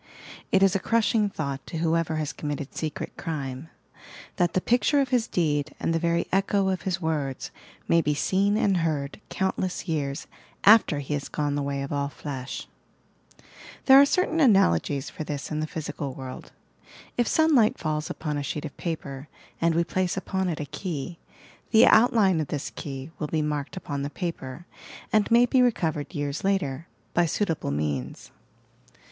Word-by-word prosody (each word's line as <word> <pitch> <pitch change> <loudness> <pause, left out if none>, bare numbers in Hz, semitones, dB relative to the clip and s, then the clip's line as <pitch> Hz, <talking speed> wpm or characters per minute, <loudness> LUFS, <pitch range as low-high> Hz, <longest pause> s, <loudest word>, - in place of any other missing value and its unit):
It 195 0 +4
ia 195 - +7
a 195 - +1
crushing 220 0 +2
thought 140 -7 -4
to 165 - -5
whoever 165 0 +1
baa 155 0 -1
committed 145 -2 -4
secret 155 -2 -4
crime, 140 -2 -5 0.3
— - - -16
that 175 -2 +2
the - - +3
picture 245 +8 +2
of 270 -2 +1
his 245 -2 +1
deed 150 -3 0
and 165 - 0
the 165 - +1
very 170 0 +1
echo 195 0 +2
of 185 -1 -1
his 190 -1 -2
words 150 -6 -2 0.4
may 165 - +4
be 150 -1 0
seen 195 +7 +2
and 195 -3 +2
heard 155 -1 -2
countless 190 -1 -2
years 145 -2 -2 0.4
after 205 -7 +6
he 145 +1 -3
has 145 -1 -3
gone 145 -1 -1
the 145 - -1
way 140 0 -2
of 140 - -5
all 140 0 -1
flesh 135 -3 -6 0.6
!" - - -20
There 270 0 +9
are - - +7
certain 350 0 +1
analogies 145 - +3
for - - -5
this 145 -1 -5
in 155 - -1
the 155 - -1
physical 150 -4 -5
world. 130 -1 -8 0.6
If 240 -2 +1
sunlight 300 -9 +4
falls 155 -1 -2
upon 150 -2 -3
a - - -3
sheet 150 +2 -4
of 145 - -7
paper 145 -4 -5 0.3
and 165 -1 +3
we 170 - +3
place 185 +2 -1
upon 190 -1 -1
it 160 - -3
a 150 - -3
key, 165 +1 -5 0.5
the 220 -1 +7
outline 215 -7 +5
of 150 - -3
this 145 -1 -4
key 135 +1 -7
will 150 - -2
be 155 0 0
marked 150 +3 -3
upon 140 -6 -4
the 140 - -2
paper 165 -3 -5 0.5
and 215 -1 +3
may 235 +1 +6
be 255 +1 +3
recovered 165 -10 0
years 145 0 -3
later 170 -7 -1 0.3
by 175 0 +3
suitable 165 - -1
means. 70 -3 -3
160 Hz, 180 wpm, -26 LUFS, 145-190 Hz, 0.6 s, There